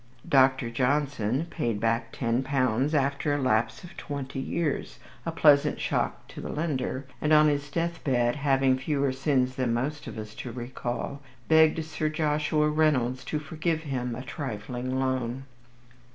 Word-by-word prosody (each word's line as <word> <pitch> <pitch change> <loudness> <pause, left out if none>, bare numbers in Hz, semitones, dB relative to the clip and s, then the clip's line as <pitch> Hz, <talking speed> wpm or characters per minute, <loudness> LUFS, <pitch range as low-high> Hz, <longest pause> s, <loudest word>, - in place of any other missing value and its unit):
Dr. 130 -3 +4
Johnson 135 0 0
paid 115 -10 -1
back 115 +2 0
ten 115 0 0
pounds 135 +1 +1
after 140 +1 +1
a - - 0
lapse 120 -1 +1
of 175 - -11
twenty 140 -2 -5
years, 150 +2 -2 0.3
a - - 0
pleasant 145 -3 +4
shock - - -1
to - - -8
the - - -6
lender, 140 -4 -2 0.2
and 150 - +1
on 155 0 +7
his 145 -1 0
death 170 +3 -2
bed 120 -2 +1
(having 135 -2 +2
fewer 140 0 0
sins 130 -1 +1
than 125 -3 +1
most 145 +5 -3
of - - -7
us 105 -1 -7
to 120 - -7
recall) 125 +2 -4 0.3
begged 160 0 +5
Sir 155 -1 -2
Joshua 150 0 +1
Reynolds 140 -5 +2
to 155 - -2
forgive 155 +2 -2
him 125 -5 -3
a 125 - -6
trifling 130 -2 -4
loan. 130 -1 -1
135 Hz, 155 wpm, -27 LUFS, 125-150 Hz, 0.3 s, on